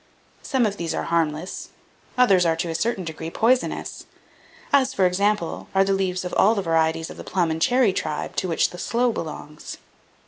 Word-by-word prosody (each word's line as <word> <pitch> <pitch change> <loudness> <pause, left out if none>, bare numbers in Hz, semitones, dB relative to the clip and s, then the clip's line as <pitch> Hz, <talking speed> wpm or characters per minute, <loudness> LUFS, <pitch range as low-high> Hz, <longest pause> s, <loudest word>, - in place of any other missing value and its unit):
Some 260 -3 +1
of 205 -1 -2
these 170 -1 -3
are - - -2
harmless, 165 +1 -2 0.5
others 200 -8 +5
are 165 -1 +2
to 170 +1 -3
a - - -2
certain 220 +3 -1
degree 160 0 -6
poisonous; 245 +8 0 0.7
as, 270 -1 +3
for 190 - +3
example, 200 0 0
are 195 - +5
the 195 0 +1
leaves 185 -1 -1
of 180 - -5
all 215 +4 +4
the 200 - -1
varieties 165 -1 +1
of - - -11
the - - -8
plum 175 -3 0
and 160 0 -3
cherry 245 -3 +3
tribe, - - -3
to 185 - 0
which 165 - +1
the 175 - -9
sloe 240 +6 +1
belongs. 150 -5 -7
185 Hz, 195 wpm, -23 LUFS, 165-215 Hz, 0.7 s, others